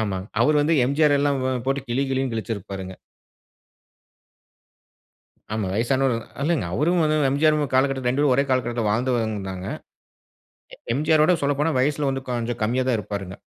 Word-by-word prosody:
ஆமாங்க. 95 -3 -3
அவர் 150 +5 +4
வந்து 155 +3 +2
எம்ஜிஆர் 145 +2 +3
எல்லாம் 140 -1 +1
வ 130 0 0
போட்டு 135 +1 0
கிழி, 120 +3 0
கிழின்னு 130 -1 -1
கிழிச்சிருப்பாருங்க. 100 -4 -5 2.6
ஆமா. 110 -3 -2
வயசானவருதான். 120 +1 0
இல்லங்க, 160 - +1
அவரும் 170 - +2
வந்து 155 0 +1
எம்ஜிஆர் 155 +3 +3 0.2
காலகட்டத்துல 130 -1 +2
ரெண்டு 135 +3 0
பேரும் 145 -3 +3
ஒரே 140 - +3
காலகட்டத்துல 120 -3 0
வாழ்ந்துவந்தாங்க. 110 -5 -2 1.1
எ - - -18 0.2
எம்ஜிஆரோட 155 +4 +3
சொல்லப்போனா, 145 +3 +1
வயசுல 145 +1 +1
வந்து 135 0 -4
கொஞ்சம் 120 -1 -3
கம்மியா 125 +4 0
தான் 125 - +2
இருப்பாருங்க. 100 -2 -5
130 Hz, 140 wpm, -23 LUFS, 115-145 Hz, 2.6 s, அவர்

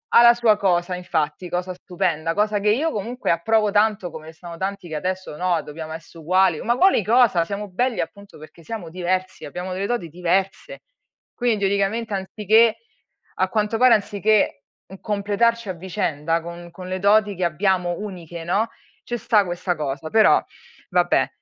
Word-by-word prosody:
ha - - +9
la 235 - +8
sua 235 -3 +3
cosa, 180 -2 +1
infatti, 175 -2 -2
cosa 180 +1 -3
stupenda, 175 -3 -2
cosa 210 +2 +1
che 210 - +1
io, 280 +10 +2
comunque, 230 +5 -4
approvo 210 +5 +2
tanto, 205 -3 +2
come 160 0 -10
sono 170 +1 -10
tanti 195 -1 -4
che 160 - -6
adesso: 185 0 -4
“No, 175 -1 0
dobbiamo 155 +1 -8 0.2
uguali”. 175 +1 +2
Ma 240 +1 0
quali 375 - +4
cosa? 220 -5 +4
Siamo 205 +2 -5
belli, 245 +6 -1
appunto, 200 +4 -9
perché 155 +2 -14
siamo 205 -3 -6
diversi, 185 +2 -3
abbiamo 180 +5 -5
delle 195 +2 -2
doti 240 -9 -2
diverse. 180 +3 -2 0.5
Quindi, 240 -4 0
teoricamente, 200 +3 0
anziché 215 +3 +3 0.6
a - - +1
quanto 215 0 0
pare, 250 -1 +6
anziché 205 -5 +1 0.4
completarci 210 +2 0
a 185 - -1
vicenda 165 -3 -2
con 170 +1 -9
con 180 +1 -10
le 185 0 -3
doti 205 0 +3
che 180 - -3
abbiamo 175 +1 0
uniche, 175 -5 -7
no, 205 +6 +1 0.3
ci 240 - -4
sta 220 -3 +3
questa 175 0 -2
cosa, 150 0 -4
però, 220 -1 +5 0.5
vabbè. - - +3
190 Hz, 160 wpm, -22 LUFS, 175-215 Hz, 0.6 s, ha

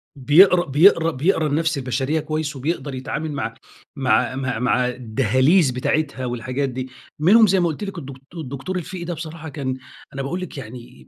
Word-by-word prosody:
بيقرا 175 +7 +5
بيقرا 165 +3 +4
بيقرا 160 +2 +1
النفس 160 +1 0
البشرية 135 +4 -1
كويس 155 -1 -3
وبيقدَر 140 -1 -3
يتعامل 150 +4 -4
مع 125 -6 -3 0.4
مع 130 -1 +1
مع 130 -4 -2
مع 125 0 +2
الدهاليز 130 - +2
بتاعتها 140 0 -1
والحاجات 130 +3 -2
دي. 130 +1 -5 0.3
مِنهم 215 +7 +6
زي 190 0 +3
ما 175 - +2
قلت 165 +6 -4
لِك 195 -3 -5
الدك 140 -4 -7 0.2
الدكتور 155 +3 -5
الفقي 180 +1 -6
ده 175 0 -3
بصراحة 160 0 -7
كان 130 -2 -4 0.4
أنا 135 - -4
باقول 175 +7 -3
لِك 180 - -7
يعني 115 - -10
145 Hz, 170 wpm, -21 LUFS, 130-165 Hz, 0.4 s, مِنهم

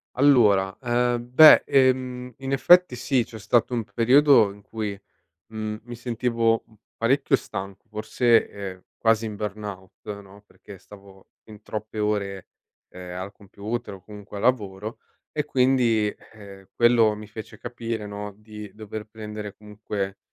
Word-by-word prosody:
Allora, 105 -9 +4
ehm, 120 -1 0
beh, 155 +3 +9
ehm, 130 -2 +1
in 135 0 -5
effetti 175 +1 +5
sì, 125 0 +1
c'è 110 -1 -11
stato 115 +4 +1
un 115 - -1
periodo 120 -1 +4
in 105 - -17
cui, 105 -1 -5 0.6
mhmm, 110 -1 -4
mi 120 -1 -8
sentivo, 115 -1 0
mhmm, 110 - -23 0.2
parecchio 130 +5 +2
stanco, 95 +4 -7
forse, 110 +2 +2
ehm, 95 -2 -8
quasi 115 0 +2
in 110 -1 -5
burnout, 105 -1 -7
no, 100 +1 -17
perché 100 - -14
stavo 95 0 -17
fin 105 -1 -14
troppe 110 0 -6
ore, 100 -3 -2 0.4
ehm, 90 0 -8
al 95 +2 -6
computer 105 +3 -6
o 95 - -16
comunque 105 0 -10
al - - -5
lavoro 105 -3 -1 0.3
e 150 -1 -2
quindi, 125 -6 +2 0.2
ehm, 100 -2 -13
quello 120 -3 +4
mi 105 - -9
fece 110 +1 -10
capire, 115 -3 -5
no, 105 0 -6
di 105 -1 -10
dover 110 0 -8
prendere 105 -1 -8
comunque 105 -2 -6
110 Hz, 145 wpm, -24 LUFS, 100-120 Hz, 0.6 s, beh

